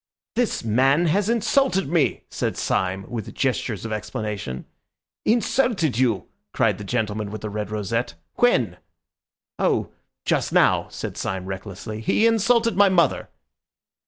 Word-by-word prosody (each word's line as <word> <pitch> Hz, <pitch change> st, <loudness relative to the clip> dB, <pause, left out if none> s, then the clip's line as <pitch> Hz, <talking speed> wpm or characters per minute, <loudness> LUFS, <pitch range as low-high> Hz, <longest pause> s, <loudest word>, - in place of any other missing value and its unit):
"This 240 Hz, -, 0 dB
man 135 Hz, +9 st, +3 dB
has 195 Hz, +6 st, +2 dB
insulted 235 Hz, -, +2 dB
me!" 160 Hz, -2 st, +1 dB
said -, -, -2 dB
Syme, 95 Hz, +1 st, -1 dB
with 115 Hz, -4 st, -6 dB
gestures 125 Hz, -5 st, -1 dB
of 115 Hz, -, -4 dB
explanation. 105 Hz, -9 st, -4 dB, 0.6 s
"Insulted 220 Hz, -, +2 dB
you?" 120 Hz, -6 st, +1 dB, 0.3 s
cried -, -, +2 dB
the -, -, -6 dB
gentleman 110 Hz, -1 st, -2 dB
with 110 Hz, +1 st, -7 dB
the 105 Hz, -, -5 dB
red 105 Hz, -1 st, -3 dB
rosette, 105 Hz, -1 st, -2 dB, 0.2 s
"when?" 120 Hz, -, +3 dB, 0.8 s
"Oh, -, -, +1 dB, 0.3 s
just -, -, +1 dB
now," -, -, +3 dB
said -, -, -6 dB
Syme 95 Hz, -1 st, -3 dB
recklessly. 100 Hz, +3 st, -6 dB
"He 215 Hz, -, +2 dB
insulted 230 Hz, 0 st, +3 dB
my 200 Hz, +1 st, +6 dB
mother." 170 Hz, -6 st, +2 dB
120 Hz, 130 wpm, -23 LUFS, -, 0.8 s, my